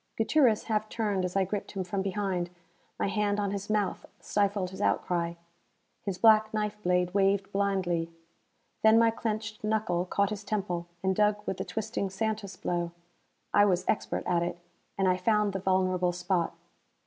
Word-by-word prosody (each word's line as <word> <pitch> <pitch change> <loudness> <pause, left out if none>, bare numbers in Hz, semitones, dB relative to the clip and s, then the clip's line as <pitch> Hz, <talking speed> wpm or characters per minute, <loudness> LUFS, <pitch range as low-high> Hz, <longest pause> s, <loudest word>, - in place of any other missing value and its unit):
Gutierrez 230 -1 +3
half 215 -1 -1
turned 205 -5 -1
as 180 - -4
I 195 - +4
gripped 195 +2 -4
him 195 -2 -2
from 190 +2 -2
behind. 190 -3 -1 0.5
My - - 0
hand 205 0 0
on 200 -1 0
his 200 0 -4
mouth 210 -3 0 0.2
stifled 200 -2 0
his 190 +1 -7
outcry. 170 -3 0 0.7
His 195 -3 -3
black 215 0 +5
knife 210 0 -2
blade 180 -1 +1
waved 195 0 +2
blindly. 185 -4 0 0.7
Then 220 0 +6
my 230 0 +5
clenched 220 -1 -4
knuckle 215 -5 0
caught 200 +2 +1
his 210 -1 -4
temple, 185 -5 -2 0.2
and 190 0 +2
dug 210 0 +4
with 190 - -2
the 190 - -3
twisting 200 0 -3
Santus 205 -1 -3
blow. 175 -1 -2 0.6
I 205 - +6
was 185 -2 +1
expert - - 0
at 175 -2 +2
it, 175 0 -2 0.4
and 195 -1 +2
I 180 0 +3
found 210 +1 +2
the 195 - -2
vulnerable 185 -1 +1
spot. 180 -1 -1
195 Hz, 170 wpm, -29 LUFS, 180-210 Hz, 0.7 s, Then